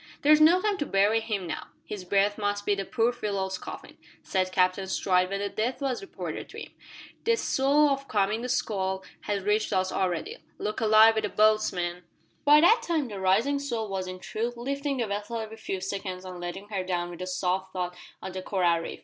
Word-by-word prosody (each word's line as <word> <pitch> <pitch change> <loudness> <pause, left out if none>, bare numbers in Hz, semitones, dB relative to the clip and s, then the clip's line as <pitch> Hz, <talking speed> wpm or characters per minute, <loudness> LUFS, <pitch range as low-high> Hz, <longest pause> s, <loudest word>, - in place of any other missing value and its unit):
"There's 305 +1 +6
no 335 +4 +7
time 415 -2 0
to 290 - 0
bury 205 +3 +3
him 215 -4 -3
now. 170 - -5 0.2
His 205 -3 -6
berth 200 +2 +2
must 205 0 -1
be 205 - +3
the 195 -1 -2
poor 235 +3 +1
fellow's 195 -5 -3
coffin," - - -9 0.2
said 185 -1 0
Captain 185 +1 +2
Stride, 185 -1 +2
when 195 0 -2
the 200 - 0
death 235 +5 -2
was 270 -3 -2
reported 395 - -6
to - - -9
him. - - -12 0.5
"The 465 - +3
swell 290 -6 +3
o' 275 - +3
the 275 - -13
coming 215 +1 0
squall 190 -6 -1 0.3
has 200 -2 0
reached 210 +2 +1
us 185 0 +1
already. 190 - -1 0.2
Look 210 +1 -3
alive 220 0 +7
wi' 220 - 0
the 210 - -2
boats, 215 +1 +3
men!" 175 -1 -3 0.4
By 295 +1 +7
that 445 +8 +6
time 315 -7 -1
the 205 -2 -6
rising 215 +10 +2
swell 235 -6 -3
was 190 -1 -3
in 185 0 -6
truth 230 +6 -4
lifting 275 +3 -2
the 240 - 0
vessel 210 +3 -3
every 220 0 -6
few 195 -3 -4
seconds 190 -1 -5
and 180 -1 -7
letting 175 +4 -6
her 195 -3 -2
down 175 -1 -2
with 175 0 -9
a 185 - -4
soft 185 +1 -1
thud 180 -1 -3 0.3
on 190 - -5
the 185 0 -5
coral 180 -3 +1
reef. 165 - -6
205 Hz, 215 wpm, -27 LUFS, 185-235 Hz, 0.5 s, no